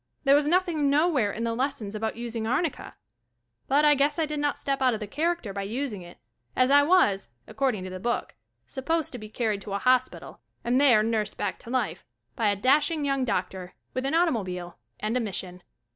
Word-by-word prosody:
There 275 -1 +5
was 290 +1 +4
nothing 335 -4 +2
nowhere 285 -7 +2
in 230 - -4
the 230 0 -1
lessons 240 -5 -3
about 220 +1 -3
using 230 -1 -4
arnicka, 295 +5 -2 0.7
but 290 +3 +3
I 295 - +7
guess 290 +1 +1
I 325 - +1
did 300 -1 -4
not 290 0 0
step 275 -1 -2
out 255 -3 +3
of - - -6
the 210 - -4
character 305 - -2
by 200 - -3
using 220 0 -3
it 175 0 -13 0.4
as 255 +1 +3
I 285 0 +7
was, 285 - +3 0.2
according 255 -8 -1
to 185 - -6
the 185 - -6
book, 240 +5 -2 0.3
supposed 315 - -2
to 250 - -7
be 215 0 -9
car 225 +1 -1
ried 205 -2 -2
to 195 +1 -6
a - - +1
hospital 255 +3 0 0.2
and 250 +3 +2
there 240 -7 +6
nursed 220 -2 -1
back 205 - -3
to - - -12
life, 250 -3 -1 0.3
by 220 -3 +1
a 205 - +1
dashing 290 - +2
young 275 -2 0
doctor, 185 -3 -3 0.2
with 255 +1 -2
an 275 - 0
automobile 185 - 0 0.2
and 215 +3 -2
a - - +2
mission. 185 -5 -5
250 Hz, 210 wpm, -26 LUFS, 210-285 Hz, 0.7 s, I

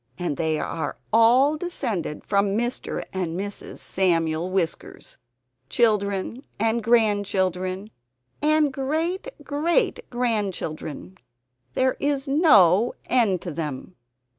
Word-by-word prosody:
And 175 -5 -2
they 160 -1 0
are 160 -3 -3 0.2
all 250 +7 +5
descended 220 - -3
from 200 0 +1
Mr. 240 +2 -2
and 180 -2 -2
Mrs. 200 +1 -5
Samuel 165 -2 0
Whiskers 185 -3 -3 0.5
children 210 +1 +1 0.2
and 225 +1 +1
grandchildren 200 -3 +1 0.5
and 305 -1 +3
great 320 - -2 0.2
great 335 +10 0
grandchildren. 195 - -3 0.6
There 260 0 +1
is 285 0 -1
no 235 - +5
end 215 -8 +2
to 175 - -4
them! 150 +2 -5
205 Hz, 100 wpm, -24 LUFS, 180-260 Hz, 0.6 s, all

